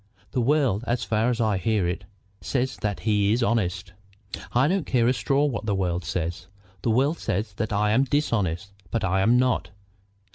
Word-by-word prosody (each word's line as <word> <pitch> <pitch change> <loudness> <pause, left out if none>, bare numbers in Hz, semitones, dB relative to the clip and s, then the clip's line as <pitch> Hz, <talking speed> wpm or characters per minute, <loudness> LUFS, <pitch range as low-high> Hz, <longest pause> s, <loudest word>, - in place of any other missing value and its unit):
"The 125 - 0
world, 130 -5 +2
as 120 0 0
far 110 +2 +1
as 120 -1 -1
I 110 -4 +1
hear 100 -1 +1
it, 90 - -3 0.4
says 130 -3 -1
that 100 +1 -3
he 105 -2 +2
is 120 +1 +1
honest." 95 -6 -1 0.6
"I 125 +3 +3
don't 185 0 0
care 120 -2 +2
a 125 - +4
straw 135 +5 +1
what 120 -6 -3
the 100 - +1
world 90 -2 -1
says. 85 0 -3 0.3
The 115 - -1
world 135 +8 +2
says 105 +2 -2
that 110 - -2
I 105 +1 +2
am 130 +5 +3
dishonest, 100 - -1 0.2
but 115 +1 -2
I 95 0 +1
am 115 +5 +4
not." 125 0 +1
110 Hz, 190 wpm, -25 LUFS, 95-125 Hz, 0.6 s, a